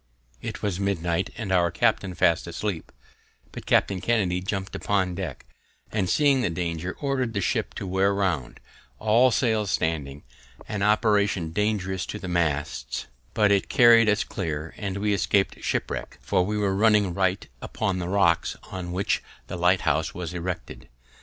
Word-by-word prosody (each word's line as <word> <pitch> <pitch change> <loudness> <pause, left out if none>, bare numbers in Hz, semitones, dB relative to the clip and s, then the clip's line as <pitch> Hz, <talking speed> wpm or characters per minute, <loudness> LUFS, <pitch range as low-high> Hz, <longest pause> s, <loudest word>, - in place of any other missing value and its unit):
It - - -6
was 100 -3 -1
midnight, 95 -2 0
and 105 -5 -4
our 90 -2 +3
captain 90 +2 0
fast 85 0 +2
asleep; 85 0 -4 0.6
but - - -9
Captain 95 -2 +2
Kennedy, 95 -6 +1
jumping 95 +1 -4
upon 95 -3 0
deck, 90 -10 -6 0.5
and 95 -4 0
seeing 140 -3 +3
the - - +1
danger, 85 +1 -3
ordered 130 -5 -1
the - - +1
ship 95 - -1
to - - -5
wear 95 +2 +2
round, 95 -10 -1 0.4
all 115 - +4
sails 110 -4 +1
standing; 75 -5 -2 0.4
an 105 -2 -3
operation 105 -4 +2
dangerous 95 -1 -1
to - - -5
the 95 - -7
masts, 80 -5 -1 0.3
but 105 -2 +4
it 100 -1 +2
carried 115 -4 +6
us 105 0 +2
clear, 80 -4 -4
and 100 -2 -4
we 105 +1 +1
escaped 95 +1 +1
shipwreck, - - -3
for 95 -2 +1
we 105 +3 -2
were 100 -2 +1
running 105 -3 +3
right 95 +1 0
upon 95 -4 -2
the 90 0 -3
rocks 90 -4 +2 0.2
on 90 -2 -5
which 95 +2 0 0.2
the - - -6
lighthouse 85 -3 +1
was 90 -2 -5
erected. 90 -1 -5
95 Hz, 160 wpm, -25 LUFS, 85-105 Hz, 0.6 s, carried